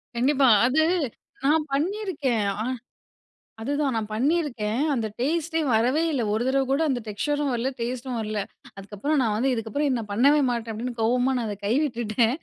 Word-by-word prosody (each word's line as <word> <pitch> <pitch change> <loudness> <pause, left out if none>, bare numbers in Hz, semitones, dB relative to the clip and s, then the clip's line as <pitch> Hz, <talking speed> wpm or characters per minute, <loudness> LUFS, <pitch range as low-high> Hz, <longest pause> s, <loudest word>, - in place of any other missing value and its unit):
கண்டிப்பா. 270 +2 +3 0.2
அது 280 +5 +3 0.6
நான் 305 +1 +3
பண்ணிருக்கேன். 295 - -1 0.2
ஆ - - -1 1.0
அதுதான் 285 +1 0
நான் 220 -1 -2
பண்ணியிருக்கேன். 250 -4 0
அந்த 225 -4 -1
டேஸ்ட்டே 325 +4 0
வரவே 250 +8 +2
இல்ல 265 -5 0
1 225 +2 0
தரவ 270 +1 +2
கூட 275 +4 +2
அந்த 250 -2 0
டெக்ஸ்சரும் 290 +7 -1
வரல, 240 +3 0
டேஸ்ட்டும் 245 +1 -3
வரல. 215 -1 -2 0.4
அதுக்கப்புறம் 205 +10 -2
நான் 215 -3 +1
வந்து 260 +4 +1
இதுக்கப்புறம் 250 +4 -1
நான் 210 -2 -7
பண்ணவே 280 +7 +4
மாட்டேன் 230 -2 -2
அப்டின்னு 240 +2 -5
கோவமா 250 +3 +2
நான் 230 - -2
அத 205 -2 -4
கைவிட்டுட்டேன். 240 -1 +1
250 Hz, 155 wpm, -25 LUFS, 225-290 Hz, 1.0 s, பண்ணவே